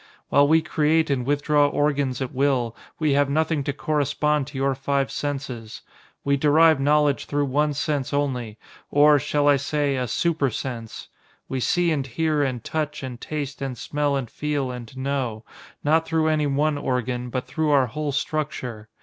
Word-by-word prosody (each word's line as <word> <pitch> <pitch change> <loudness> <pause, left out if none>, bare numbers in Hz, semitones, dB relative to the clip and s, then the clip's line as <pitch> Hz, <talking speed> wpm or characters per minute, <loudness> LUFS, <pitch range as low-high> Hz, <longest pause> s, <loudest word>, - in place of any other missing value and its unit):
"While 145 0 +5
we 160 +1 +4
create 160 0 +2
and 125 -2 -1
withdraw 145 0 +3
organs 140 -3 0
at 130 - -6
will, 130 -4 +1 0.2
we 155 -2 +1
have 140 0 +2
nothing 155 0 +1
to - - 0
correspond 150 0 0
to 145 -1 -8
your 135 0 +1
five 135 +1 -1
senses. 130 -6 -5 0.4
We 140 0 +2
derive 155 +1 +5
knowledge 145 -1 +2
through 145 0 0
one 145 +2 +1
sense 145 -2 -1
only, 125 -6 -2 0.3
or, 145 0 +5
shall 145 +1 0
I 145 -1 +6
say, 145 0 -1
a 125 -1 -1
super 155 +3 +1
sense? 115 -1 -6 0.4
We 130 - -3
see 170 +8 +2
and 140 -4 -1
hear 155 +3 0
and 130 -5 -1
touch 150 -2 -3
and 125 -2 -7
taste 145 -2 -5
and 135 -3 -3
smell 145 +3 -1
and 135 -3 -2
feel 145 +1 -2
and 125 0 -9
know, 130 -5 -2 0.4
not 160 +2 +2
through 160 -1 +1
any 155 -1 +1
one 145 +1 +1
organ, 125 -2 -2
but 125 +1 -3
through 150 +4 -1
our 140 -3 +4
whole 145 +4 -3
structure. 130 -7 -3
145 Hz, 175 wpm, -24 LUFS, 130-150 Hz, 0.4 s, I